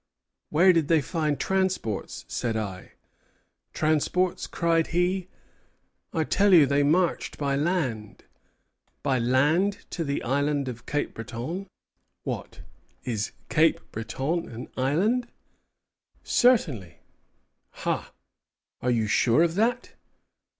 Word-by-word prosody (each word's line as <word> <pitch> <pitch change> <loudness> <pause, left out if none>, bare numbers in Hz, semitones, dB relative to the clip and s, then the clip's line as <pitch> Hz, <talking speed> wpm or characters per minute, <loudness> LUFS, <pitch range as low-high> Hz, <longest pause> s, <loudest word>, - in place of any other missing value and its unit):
Where 180 +5 +5
did 165 -4 +1
they 165 -1 +4
find 150 -1 -1
transports? 185 - -1
said 115 -2 -2
I. 100 -4 -6 0.8
Transports! 155 +4 0
cried 165 -1 +1
he, 180 +2 0 0.8
I 160 -3 0
tell 200 +4 +4
you 155 -4 +8
they 140 +1 +2
marched 165 +5 +1
by 140 -2 0
land. 140 - -2 0.8
By 130 -2 +1
land 150 +12 +2
to 170 - -2
the 140 -2 -2
island 140 +2 0
of 125 -1 -7
Cape 145 0 -1
Breton! 125 - -5 0.6
What, - - -5 0.4
is 110 -5 -2 0.2
Cape 160 +1 +3
Breton 135 +10 -3
an 120 +1 -8
island? 195 - +1 1.0
Certainly. 145 - +2 0.9
Ha! - - -1 0.7
are 125 - 0
you 115 -3 +2
sure 115 +7 +3
of 170 -1 +1
that? 235 +6 0
150 Hz, 110 wpm, -26 LUFS, 125-180 Hz, 1.0 s, you